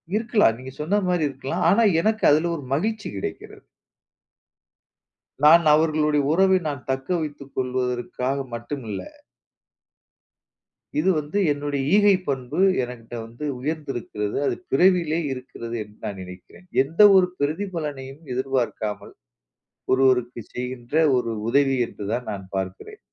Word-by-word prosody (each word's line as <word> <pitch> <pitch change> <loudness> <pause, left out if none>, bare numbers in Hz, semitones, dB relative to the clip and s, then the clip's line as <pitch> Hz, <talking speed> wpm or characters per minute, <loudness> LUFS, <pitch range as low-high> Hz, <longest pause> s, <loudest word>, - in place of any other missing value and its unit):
இருக்கலாம். 220 - +3
நீங்க 130 +1 -9
சொன்ன 200 +7 +1
மாரி 180 -3 +1
இருக்கலாம். 135 0 -4
ஆனா 230 +4 +4 0.2
எனக்கு 220 +3 0
அதுல 160 +3 +3
ஒரு 150 - -7
மகிழ்ச்சி 210 +8 -1
கிடைக்கிறது. 95 - -7 1.8
நான் 165 +3 +8
அவர்களுடைய 150 -1 +2
உறவை 190 +2 +4
நான் 140 -4 -5
தக்க 130 0 -2
வைத்துக் 145 -3 -7
கொள்வதற்காக 125 +1 -2 0.2
மட்டுமில்ல. 120 -3 -5 2.0
இது 190 - +2
வந்து 150 +7 -4 0.2
என்னுடைய 145 -1 -3
ஈகை 205 -1 +6
பண்பு. 135 +3 -3 0.2
எனக்கிட்ட 120 -1 -8
வந்து 120 +6 -8
உயர்ந்திருக்கிறது. 130 -8 -3
அது - - 0 0.2
பிறவியிலயே 175 -3 +3
இருக்கிறது 120 -2 -7
என்று 105 0 -19
நான் 100 -2 -5
நினைக்கிறேன். 90 - -13 0.2
எந்த 160 +7 -13 0.2
ஒரு 185 -1 +5
பிரதிபலனையும் 150 -4 -3
எதிர்பார்க்காமல், 125 -5 -2 0.8
ஒருவருக்குச் 125 -3 +2
செய்கின்ற 125 +1 -6 0.2
ஒரு 115 -2 -2 0.2
உதவி 135 +1 +3
என்றுதான் 115 +5 -4
நான் 100 -2 -7
பார்க்கிறேன். 95 0 -5
135 Hz, 115 wpm, -23 LUFS, 120-160 Hz, 2.0 s, நான்